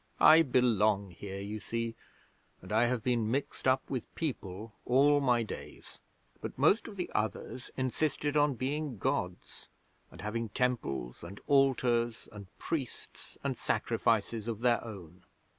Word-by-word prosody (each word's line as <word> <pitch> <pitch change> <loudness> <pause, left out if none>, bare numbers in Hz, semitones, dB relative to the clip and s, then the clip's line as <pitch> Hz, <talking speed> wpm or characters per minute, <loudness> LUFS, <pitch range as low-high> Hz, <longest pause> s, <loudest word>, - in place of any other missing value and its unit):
I 160 +1 +9
belong 110 - +2
here, 95 +3 -7
you 105 +2 -5
see, 115 +1 -3 0.7
and 90 - -11
I 115 +3 +4
have 120 -2 -1
been 120 -4 +1
mixed 135 +1 -2
up 130 0 +3
with 130 -4 -5
people 110 - -4
all 145 +3 +4
my 120 -3 +3
days. 110 - -9 0.4
But - - -6
most 160 - +4
of 215 - -9
the 180 -2 -4
others 110 +3 -3
insisted 145 +3 0
on 145 -2 +3
being 140 +1 -2
Gods, 90 -1 -3 0.4
and - - -12
having 110 +2 -3
temples, 70 - -2
and 95 +4 -8
altars, 125 -4 +2
and 100 -2 -10
priests, 145 -7 -5
and - - -1
sacrifices 110 0 0
of 115 -1 -3
their 120 -1 +3
own.' 90 -6 -10
120 Hz, 140 wpm, -31 LUFS, 105-135 Hz, 0.7 s, I